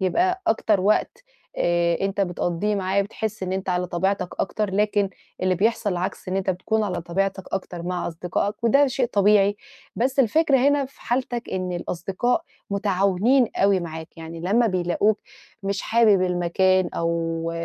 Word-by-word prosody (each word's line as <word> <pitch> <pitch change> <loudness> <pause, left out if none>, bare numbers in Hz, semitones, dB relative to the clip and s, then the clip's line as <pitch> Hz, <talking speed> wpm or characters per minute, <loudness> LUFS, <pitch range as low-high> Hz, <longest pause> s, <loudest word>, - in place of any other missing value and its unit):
يبقى 365 - +1
أكتر 215 - +2
وقت 215 - +1 0.3
آآ، 170 -1 +2
أنتَ 195 +1 -1
بتقضِيه 180 +2 -1
معاه، 195 0 +1
بتحس 215 +1 -5
إن 185 0 -2
أنتَ 190 0 -3
على 180 0 0
طبيعتك 185 +2 -1
أكتر. 210 +1 -1
لكن 205 -1 +1 0.3
اللي 185 0 +2
بيحصل 215 +3 +1
العكس، 180 +1 -3
إن 185 - -1
أنتَ 195 0 0
بتكون 200 +4 -1
على 180 -4 -2
طبيعتك 190 +2 -2
أكتر 175 -2 -4
مع 180 +1 -2
أصدقائك، 180 +6 -3
وده 275 +5 +5
شيء 255 -1 0
طبيعي. 205 -2 +3 0.4
بس 260 +4 0
الفكرة 275 +3 +3
هنا، 285 +2 +3
في 270 +2 -14
حالتك 245 0 -2
إن 185 -1 -2
الأصدقاء 185 - -1 0.3
متعاونين 200 +5 +2
أوي 195 -1 +3
معاك 160 0 -8
يعني، 165 0 -8
لمّا 210 +8 +2
بيلاقوك 185 +2 +1 0.4
مش 195 0 -2
حابب 220 -5 +4
المكان 185 +1 +2
أو 165 0 -1
195 Hz, 155 wpm, -23 LUFS, 180-220 Hz, 0.4 s, وده